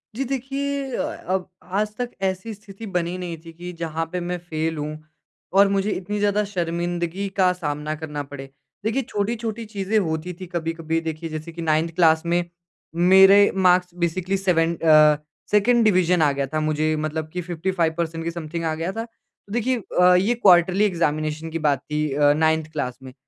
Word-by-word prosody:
जी 270 - -1
देखिए 275 +1 -3
अ, - - -1 0.2
अब 185 0 -1
आज 210 +3 -2
तक 245 -1 -2
ऐसी 190 +4 -2
स्थिति 205 +1 -11
बनी 175 +1 -2
नहीं 175 -2 -5
थी 165 - -9
कि 175 +2 -8
जहाँ 165 0 -2
पे 180 - -2
मैं 175 0 -3
फेल 160 0 -2
हूँ 150 +1 -4 0.6
और 200 0 +7
मुझे 200 +1 0
इतनी 205 +3 -3
ज़्यादा 205 0 +2
शर्मिंदगी 175 0 -2
का 185 -1 +4
सामना 150 -3 -3
करना 150 -2 -5
पड़े। 135 -1 -9 0.4
देखिए 225 +5 +1
छोटी-छोटी 225 0 -3
चीज़ें 210 0 -1
होती 160 0 -2
थी 185 - -6
कभी-कभी 165 -1 -2
देखिए 160 0 -5
जैसे 155 +2 -6
कि 170 +1 -7
9एथ 160 +1 +1
क्लास 160 -2 +4
में 175 +1 +1 0.7
मेरे 195 +2 +7
मार्क्स 180 -1 +3
बेसिकली 185 +3 0
सेवेन 170 -3 +1
अ, 155 -2 +5 0.3
2एंड 230 +3 +4
डिवीज़न 180 -3 +3
आ 145 -2 +4
गया 140 0 -1
था, 155 +3 -2
मुझे 155 0 0
मतलब 155 0 -3
कि 180 - -2
55 170 -1 -1
पर्सेंट 165 -1 -2
के 170 - -2
समथिंग 165 0 -5
आ 160 - 0
गया 165 +4 -3
था। 225 +3 -4
तो 225 -3 -18
देखिए 245 +2 +1 0.2
अ, 180 0 +7
ये 195 +6 +3
क्वार्टरली 185 -1 +5
एग्ज़ामिनेशन 155 -3 -1
की 165 - -3
बात 145 -4 +2
थी 150 -1 0
अ, 145 +1 +4
9एथ 160 0 +1
क्लास 130 -5 -3
में, 130 - -10
175 Hz, 185 wpm, -23 LUFS, 160-195 Hz, 0.7 s, और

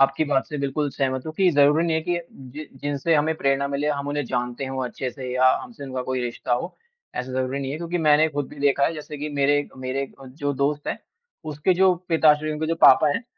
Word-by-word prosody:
आपकी 135 +3 +3
बात 140 -2 +1
से 150 - -5
बिल्कुल 140 +2 -1
सहमत 130 -1 -1
हूँ 155 - -4
कि 190 -2 +4
ज़रूरी 145 +2 +4
नहीं 165 - +1
है - - 0
कि 175 +1 -1 0.3
जि 150 +3 -8
जिनसे 145 +3 0
हमें 155 +2 +2
प्रेरणा 140 0 +1
मिले 140 +1 -1
हम 140 -1 -2
उन्हें 145 -1 -1
जानते 125 +2 -3
हों 130 -1 -3
अच्छे 125 +1 -4
से 125 +1 -7
या 130 0 +5
हमसे 125 +3 -10
उनका 130 -1 -4
कोई 130 0 -2
रिश्ता 120 0 -3
हो। 125 +9 -2 0.4
ऐसा 125 +1 -4
ज़रूरी 130 +1 -1
नहीं 135 -1 -4
है, 145 - -3
क्योंकि 170 +2 -3
मैंने 155 0 +4
ख़ुद 145 -2 -3
भी - - -13
देखा 140 0 +3
है - - +1
जैसे 150 -1 -8
कि 150 +1 -4
मेरे 145 +1 +2
मेरे 130 +1 -2 0.2
अ, 135 - -11
जो 145 +2 -3
दोस्त 145 +2 -1
हैं - - -2 0.5
उसके 155 +4 0
जो 185 0 +4
पिताश्री 155 -2 +4
हैं, 155 - -1
उनके 155 +1 -3
जो 165 - 0
पापा 150 -1 +6
हैं 235 - -3
145 Hz, 240 wpm, -23 LUFS, 130-155 Hz, 0.5 s, पापा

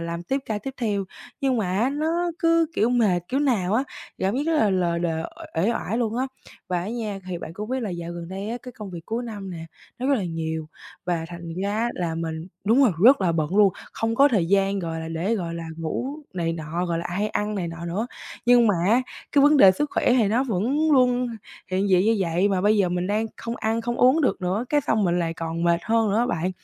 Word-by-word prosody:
làm 170 0 -4
tiếp 265 +11 -1
ca 215 -2 -2
tiếp 265 +6 -7
theo. 205 -5 -1 0.4
Nhưng 265 -2 +1
mà 200 -6 -1
á 245 +4 +2
nó 330 +4 0
cứ 330 0 +3
kiểu 225 +3 +2
mệt 215 -8 +3
kiểu 270 +2 0
nào 215 -9 +1
á, 255 +4 +2 0.3
cảm 195 +5 0
giác 275 - 0
rất 330 - +2
là 220 -8 +3
lờ 175 -3 +1
đờ, 165 -2 -1 0.3
uể 165 - +2
uể 230 - +2
oải 225 0 -2
luôn 230 -2 -1
á. 260 +2 0 0.4
Và 180 -1 0
á 185 - -4
nha, 220 -3 -3
thì 175 - -3
bạn 165 - -7
cũng 210 +6 -6
biết 260 0 -1
là 215 - -3
dạo 170 -1 -5
gần 170 0 -7
đây 195 +2 -5
á, 235 - -2
cái 250 - -9
công 210 -4 -8
việc 170 -2 -9
cuối 230 +2 -2
năm 205 -5 -6
nè, 165 -2 -7 0.3
nó 255 - -2
rất 280 - +4
là 215 -8 -1
nhiều 160 -2 -3 0.4
và 170 -2 -1
thành 170 -1 -7
ra 210 +4 0
là 170 -2 -2
mình 160 0 -4 0.2
đúng 230 +7 +4
rồi, 245 -7 +4
rất 265 0 +8
là 180 -3 +2
bận 160 +3 -1
luôn, 205 -3 +6 0.2
không 225 0 -1
có 275 +4 +6
thời 205 -10 +1
gian, 195 +2 +2
gọi 165 -3 -3
là, 160 - -5
để 170 +7 -1
gọi 170 -5 -3
là 170 - -5
ngủ 165 +10 -3 0.3
này 165 -2 -1
nọ, 165 +2 -3
gọi 170 -1 -1
là, 170 - -3
hay 200 +4 -1
ăn 210 0 -2
này 175 -4 -2
nọ 165 0 -7
nữa. 200 +7 -2 0.4
Nhưng 245 -1 +6
mà 205 - +4
á 240 +4 +4 0.3
cái 285 - +5
vấn 295 +1 +6
đề 195 -9 +9
sức 295 +9 -2
khỏe - - +2
thì 235 -5 +3
nó 235 +6 +2
vẫn 265 - +1
luôn 250 -2 +3 0.4
hiện 190 +2 +1
diện 185 0 +4
như 225 +1 +3
vậy 180 +2 +1
mà 190 -2 +1
bây 210 +3 +3
giờ 195 -3 +3
mình 180 0 -1
đang 210 +3 0
không 230 +1 -5
ăn, 225 +1 -1
không 240 +1 -3
uống 260 +6 +5
được 260 - +1
nữa, 185 +5 -1
cái 295 - +3
xong 220 -6 +1
mình 175 0 +1
lại 165 -1 -1
còn 165 0 -3
mệt 170 0 +3
hơn 225 -1 +2
nữa 200 - +1
á 240 - +2
bạn. 180 -6 -1
200 Hz, 260 wpm, -24 LUFS, 170-240 Hz, 0.4 s, đề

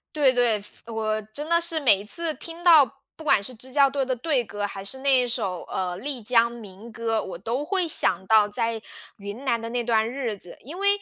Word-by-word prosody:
对， 285 -4 +4
对， 240 -4 +2
服 225 +2 -11
我 215 -1 -1
真 295 +6 -6
的 335 0 +4
是 335 -2 -1
每 245 -8 +5
一 200 - -8
次 330 +9 +1
听 335 +2 -10
到， 320 -6 +7 0.3
不 315 - -11
管 270 -9 +3
是 255 - -2
支 255 +2 -10
教 280 -1 +4
队 270 -1 -1
的 260 - 0
队 255 0 0
歌， 205 -1 -5
还 195 -1 -5
是 265 +7 -2
那 265 -2 +3
首， 205 -7 -2
呃， 180 -1 -3
丽 260 +4 -4
江 235 +1 +3
民 215 -1 -11
歌， 225 -1 -1
我 180 -4 -7
都 230 +9 -3
会 370 +1 0
想 190 - +3
到 215 -2 +5
在 225 +1 -2 0.4
云 205 +5 -8
南 235 -4 0
的 230 - -5
那 245 0 -1
段 225 -2 +1
日 240 -4 -3
子。 180 -2 -11
因 310 +8 -9
为 400 - -1
235 Hz, 245 characters per minute, -24 LUFS, 215-280 Hz, 0.4 s, 到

